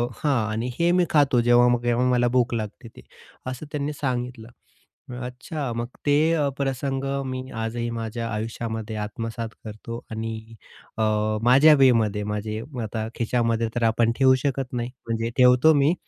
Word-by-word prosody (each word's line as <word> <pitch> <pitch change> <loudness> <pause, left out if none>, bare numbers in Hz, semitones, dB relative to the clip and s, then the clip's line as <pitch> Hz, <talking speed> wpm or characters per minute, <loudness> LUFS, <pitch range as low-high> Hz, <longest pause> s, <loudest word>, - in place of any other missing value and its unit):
हां. 130 -8 0
आणि 115 +3 -2
हे 170 +1 +3
मी 180 - +4
खातो, 140 -5 +3
जेव्हा-केव्हा 120 0 +4
मला 120 -1 +3
भूक 120 -1 +2
लागते 110 0 -5
ते. - - -12 0.4
असं 130 +3 -5
त्यांनी 150 -1 -2
सांगितलं. 125 -4 -3 0.8
अच्छा, 125 +2 -5
मग 120 +1 -3 0.2
ते 145 -1 +4 0.4
प्रसंग 135 0 -2 0.2
मी 130 0 -5
आजही 115 +1 -3
माझ्या 115 +1 -4
आयुष्यामध्ये 110 0 -4
आत्मसात 115 +1 -5 0.2
करतो. 110 +2 -7
आणि 110 0 -3 0.6
अ, 110 - +1 0.4
माझ्या 135 +6 +7
वेमध्ये 110 -5 +3
माझे 105 +1 -3 0.2
आता 110 0 -4
खिशामध्ये 115 -1 0
तर 120 - 0
आपण 115 +1 +2
ठेवू 130 -1 +5
शकत 135 -2 -2
नाही. 120 0 -2 0.2
म्हणजे 115 0 -1
ठेवतो 125 +5 +6
मी, 145 +3 +3
120 Hz, 140 wpm, -24 LUFS, 115-130 Hz, 0.8 s, माझ्या